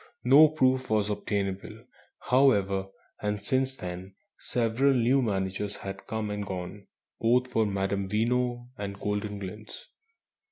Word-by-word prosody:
No 140 +5 +8
proof 130 -4 +1
was 105 -1 +1
obtainable, 100 -2 -3 0.4
however, 100 -8 +3 0.3
and 105 0 -1
since 130 +5 0
then 90 +2 -7 0.2
several 125 +4 +1
new 125 +3 +3
managers 100 -2 -2
had 95 0 -8
come 110 -1 -3
and 105 0 -3
gone, 95 +1 -6 0.3
both 125 +2 +3
for 115 -3 +1
Madame 95 0 -1
Veno 120 +3 0
and 100 -1 -4
"Goldenglints." 105 0 -5
105 Hz, 120 wpm, -28 LUFS, 100-125 Hz, 0.4 s, No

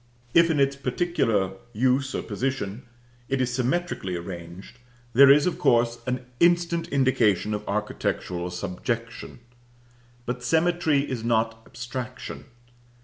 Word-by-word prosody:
If, 170 0 +6
in 155 -3 +1
its 140 0 +3
particular 125 - 0 0.2
use 130 +4 +1
or - - -2
position, 120 -1 -3 0.4
it 135 - 0
is 125 -1 0
symmetrically 130 - -1
arranged, 85 +5 -8 0.3
there 135 +3 +8
is, 145 +1 +6
of 180 - -1
course, 120 0 +3
an 125 0 -2
instant 170 0 +3
indication 115 -7 +2
of 105 0 -4
architectural 95 -4 -2
subjection. 115 +7 -5 0.8
But 125 0 -3
symmetry 160 +1 +2
is 120 -4 -4
not 115 -1 0
abstraction. 125 +1 -7
125 Hz, 120 wpm, -25 LUFS, 105-140 Hz, 0.8 s, there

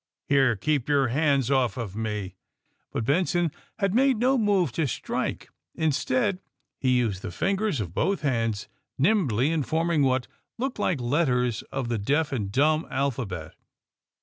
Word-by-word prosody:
Here, 135 -4 +4
keep 145 +5 -1
your 140 -4 +3
hands 140 -1 +2
off 130 -5 +2
of 110 -5 -5
me! 105 -4 -3 0.3
" - - -47
But 115 - -2
Benson 175 +3 +1 0.3
had 195 -3 0
made 265 +1 +4
no 255 +4 +3
move 200 - +2
to 160 +1 0
strike. 120 - -3 0.2
In 160 -1 +1
stead 145 +8 0 0.4
he 130 -1 +2
used 110 -6 0
the - - -5
fingers 195 - 0
of 90 -6 -4
both 195 - 0
hands 115 -7 -1 0.3
nimbly 145 - +2
in 165 -2 +1
forming 160 +2 +1
what 130 -2 +2 0.3
looked 255 -1 -3
like 180 -7 +1
letters 125 -3 +1
of 135 -3 -2
the 115 -2 -1
deaf 145 +9 +1
and 105 -7 -2
dumb 155 +6 +2
alphabet. 115 - -3
140 Hz, 160 wpm, -26 LUFS, 120-170 Hz, 0.4 s, Here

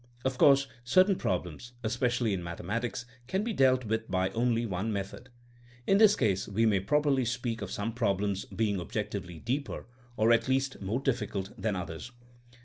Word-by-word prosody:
Of 130 -1 -1
course 140 -1 +6 0.2
certain 185 +10 +4
problems, 90 - -3
especially 120 -1 0
in 90 -2 -3
mathematics, 105 +8 -3 0.2
can 190 +8 0
be 230 0 -2
dealt 130 - +3
with 110 +1 -2
by 95 0 0
only 115 0 +1
one 100 +1 -2
method. 100 +5 -5 0.6
In 195 - +4
this 215 -1 +7
case 100 -6 0
we 110 +3 +1
may 105 -3 +3
properly 140 +6 +2
speak 120 -1 -2
of 100 - -4
some 105 +4 -3
problems 100 -3 0
being 105 -3 -1
objectively 95 -3 -4
deeper 130 - -3 0.3
or 110 +2 +4
at 115 - +3
least 135 -1 0
more 100 +6 -1
difficult 105 -7 -2
than 110 -3 -1
others. 90 +5 -6
115 Hz, 165 wpm, -30 LUFS, 100-130 Hz, 0.6 s, this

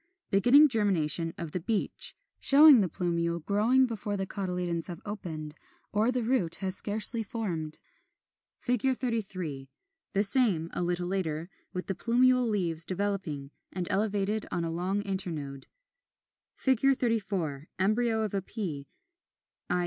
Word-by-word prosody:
Beginning 245 +10 +6
germination 175 - +3
of 165 -2 -6
the 180 - -2
Beech, 205 +4 +1 0.2
showing 285 -3 +8
the 185 - 0
plumule 170 -1 -1
growing 230 +6 +3
before 210 -4 -4
the 195 - -2
cotyledons 180 -4 -2
have 175 -2 -7
opened 160 -7 -6 0.4
or 215 +4 +1
the 250 -1 -1
root 220 -9 +1
has 190 0 0
scarcely 220 +3 +3
formed. 180 -9 -3 0.9
33. 225 - -2 0.4
The 200 0 +2
same, 200 -8 +2
a - - -3
little 175 0 -1
later, 175 -2 -3 0.2
with 180 - -5
the 195 - -2
plumule 250 +4 +2
leaves 170 -6 +1
developing, 185 -7 -3 0.2
and 180 -1 -4
elevated 205 +1 -1
on 170 - -2
a 165 - -3
long 185 +4 -2
internode.] 165 -9 -5 1.0
[Illustration: 265 0 +3
Fig. - - -22
34. 195 - -2
Embryo 220 +4 +1
of 210 - -4
Pea, 155 - -5 0.8
i. 180 - +1
195 Hz, 135 wpm, -28 LUFS, 170-220 Hz, 1.0 s, showing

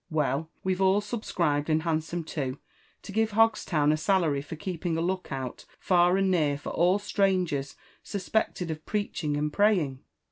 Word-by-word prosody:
Well, 155 -1 0
we've 185 0 0
all 190 +1 +4
subscribed 170 -9 -1
and 155 0 +2
handsome 165 +1 -1
too, 140 -4 -4 0.5
to - - -8
give 220 +1 +1
Hogstown 205 -9 +3
a 155 - +2
salary 155 -4 +1
for 150 +3 -7
keeping 175 -1 -3
a - - 0
look 185 +1 -2
out 130 -2 -5
far 180 0 +3
and 195 -1 +2
near 150 -5 +2
for 145 - -7
all 180 +4 +3
strangers 185 -9 0 0.3
suspected 195 -4 -2
of 155 0 -6
preaching 180 -8 -2
and 150 0 -1
praying. 180 -11 +2
170 Hz, 165 wpm, -28 LUFS, 150-195 Hz, 0.5 s, all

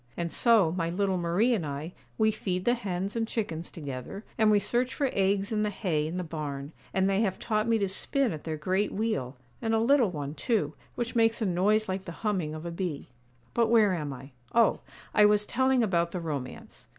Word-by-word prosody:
And 170 -1 -2
so, 225 -9 +4
my 165 -1 -1
little 190 +1 0
Marie 180 +9 +2
and 205 -7 0
I, 150 +4 -5 0.2
we 220 -1 +4
feed 185 -3 -3
the 240 - +4
hens 195 -4 -3
and 225 -1 0
chickens 170 -8 -3
together, 145 - -7
and 220 -1 +4
we 210 - +5
search 245 +5 0
for 275 -3 0
eggs 195 +1 +1
in 215 -1 +1
the 210 - +1
hay 165 -7 -1
in 170 +3 -4
the 180 - -2
barn; 150 -3 -5 0.2
and 190 0 +2
they 195 +1 +2
have 190 -4 0
taught 215 -1 0
me 230 -1 +3
to 200 -2 0
spin 250 - 0
at 155 - -7
their 160 -1 -3
great 190 +6 0
wheel, 145 - -2 0.2
and 225 -1 +1
a - - +3
little 245 -1 +4
one, 145 -4 -5
too, 215 - 0 0.2
which 240 -1 -3
makes 225 0 +3
a 220 - 0
noise 205 +4 +2
like 190 0 -3
the 170 - -6
humming 180 -7 0
of 155 +2 -7
a 170 - -3
bee. 170 -4 -4 0.4
But 235 -1 +3
where 220 -4 +5
am 150 -5 -3
I? 135 +1 -9 0.2
Oh, 230 -2 +4 0.3
I 210 - +6
was 210 0 +4
telling 260 +1 +2
about 170 -5 +1
the 180 - -2
romance. 145 -6 -6
195 Hz, 220 wpm, -28 LUFS, 165-220 Hz, 0.4 s, I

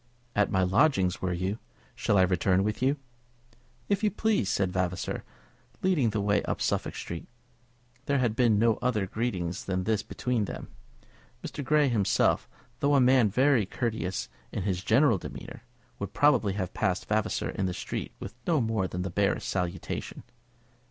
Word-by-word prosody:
"At 105 -1 +3
my 95 0 +2
lodgings, 95 - +2
were 95 - -1
you? 95 +4 -2 0.3
Shall 100 - +1
I 95 - +6
return 90 +1 +2
with 105 +2 -2
you?" 135 +3 +2 0.9
"If 200 +1 0
you 210 - +4
please," 210 - +1
said 95 -2 +1
Vavasor, 90 -1 -2 0.6
leading 170 -11 +3
the 105 0 -1
way 100 0 +2
up - - -3
Suffolk - - -1
Street. 85 -1 -6 0.8
There 140 - +2
had 120 -4 +1
been 115 -3 +4
no 115 0 +3
other 120 -5 +1
greeting 95 -5 -2
than 95 -1 0
this 110 0 +1
between 120 -2 -1
them. - - -7 0.7
Mr. 145 - -5
Grey 150 +1 +3
himself, 110 -6 +2 0.3
though 145 0 +3
a - - +6
man 125 -3 +5
very 125 -1 +3
courteous 110 -5 -2 0.2
in - - -3
his 95 -2 -1
general 115 -2 +4
demeanour, - - -8 0.4
would 100 - -5
probably 145 -9 +3
have 95 -3 -3
passed 95 0 0
Vavasor 110 0 0
in 95 - -1
the - - -1
street - - -4
with 100 - -7
no 165 -4 +3
more 110 -5 0
than 90 0 -4
the 95 - -4
barest 100 +2 0
salutation. 90 -2 -3
105 Hz, 165 wpm, -28 LUFS, 95-125 Hz, 0.9 s, I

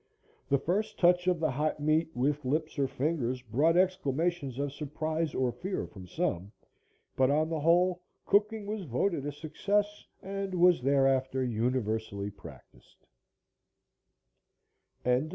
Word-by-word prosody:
The 140 - +4
first 205 +9 -1
touch 180 0 +4
of 180 -2 +2
the 155 -3 +1
hot 150 +4 -1
meat 155 +2 +2
with 145 +4 0
lips 155 +3 -1
or 135 - +2
fingers 130 -2 -2
brought 145 +9 +2
exclamations 170 -5 0
of 140 0 -2
surprise 155 +2 -3
or 130 -2 +1
fear 185 +8 -4
from 95 -3 -12
some, 100 - -2 0.6
but, 130 0 +3
on 155 +2 +2
the 160 -1 -2
whole, 175 +3 +3 0.2
cooking 210 +1 +2
was 210 0 -3
voted 145 +3 -1
a - - -2
success 200 +8 -2 0.2
and 195 0 -4
was 175 -3 +5
thereafter 135 -1 +2
universally 110 -4 -1
practiced. 100 - -16
150 Hz, 130 wpm, -30 LUFS, 130-180 Hz, 0.6 s, was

